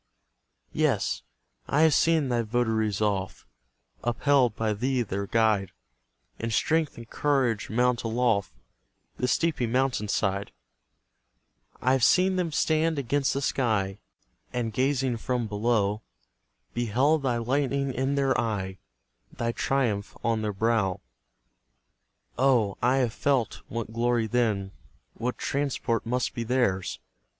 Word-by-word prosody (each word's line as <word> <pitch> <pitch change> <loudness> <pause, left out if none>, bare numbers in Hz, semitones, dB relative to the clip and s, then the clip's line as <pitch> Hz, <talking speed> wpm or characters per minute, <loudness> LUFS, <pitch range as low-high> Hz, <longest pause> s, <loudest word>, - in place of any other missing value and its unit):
Yes, - - +1 0.5
I 150 - +2
have 160 -2 +5
seen 160 -5 +3
thy 120 -1 +1
votaries 110 -2 0
oft, 100 -3 -1 0.6
Upheld 125 -1 +2
by 110 -1 0
thee 125 +4 0
their 100 -1 -4
guide, 110 -4 +2 0.7
In 115 - -2
strength 160 +6 +1
and 115 -1 -9
courage 130 -6 0
mount 125 +2 +2
aloft 115 -3 +1 0.7
The 125 - 0
steepy 150 -3 +1
mountain 125 -2 0
side; 100 -1 -1 1.3
I've 130 -1 +3
seen 185 +5 +4
them 180 -3 -1
stand 160 +1 +1
against 140 +1 0
the 140 - -1
sky, 105 -8 0 0.5
And 120 -3 -2
gazing 130 0 +1
from 125 +1 -2
below, 105 -1 0 0.7
Beheld 125 +7 +2
thy 125 -3 0
lightning 135 +2 0
in 135 +2 0
their 135 -2 +2
eye 95 -5 -3 0.5
Thy 115 0 -2
triumph 115 -6 -1
on 115 -1 +1
their 105 -1 -1
brow. 105 -2 +1 1.4
Oh, 120 -7 +3
I 125 +2 +3
have 125 -4 +1
felt 135 -5 0
what 115 -1 -5
glory 120 0 +1
then, 110 -4 0 0.4
What 125 +2 -3
transport 135 -5 -1
must 125 +1 -1
be 115 - -3
theirs! 115 -6 0
120 Hz, 125 wpm, -27 LUFS, 110-135 Hz, 1.4 s, have